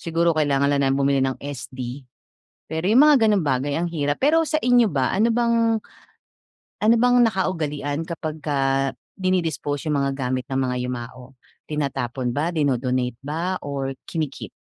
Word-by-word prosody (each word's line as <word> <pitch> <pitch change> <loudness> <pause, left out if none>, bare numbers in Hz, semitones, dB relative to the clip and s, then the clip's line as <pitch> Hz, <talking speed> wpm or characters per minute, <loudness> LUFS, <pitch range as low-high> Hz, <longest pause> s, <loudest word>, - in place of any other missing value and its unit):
siguro 170 0 +1
kailangan 140 -2 +2
lang 140 - +2
namin 135 +1 +1
bumili 140 0 +2
ng 130 -1 -2
SD. 130 -1 -7 0.6
Pero 160 +2 -3
'yong 240 +7 +6
mga 295 - +7
gano'ng 205 -4 +3
bagay 135 +2 0
ang 175 - -1
hirap. 145 -2 -1
Pero 320 +4 +4
sa 310 - +1
inyo 245 -2 +4
ba, 130 -3 +1
ano 215 +4 +3
bang 230 -1 +2 1.0
ano 225 +2 +5
bang 245 0 +4
nakaugalian 160 -7 -1
kapagka 140 -5 -1 0.3
dini-dispose 165 -6 -1
'yong 150 - +1
mga 140 - 0 0.2
gamit 130 0 -1
ng 135 - 0
mga 125 -1 0
yumao, 125 +1 -7 0.4
tinatapon 130 -4 -2
ba, 160 +4 0
dino-donate 130 -5 0
ba, 165 +6 -2
or 135 -1 -3
kini-keep? 155 -5 -4
145 Hz, 150 wpm, -23 LUFS, 135-185 Hz, 1.0 s, mga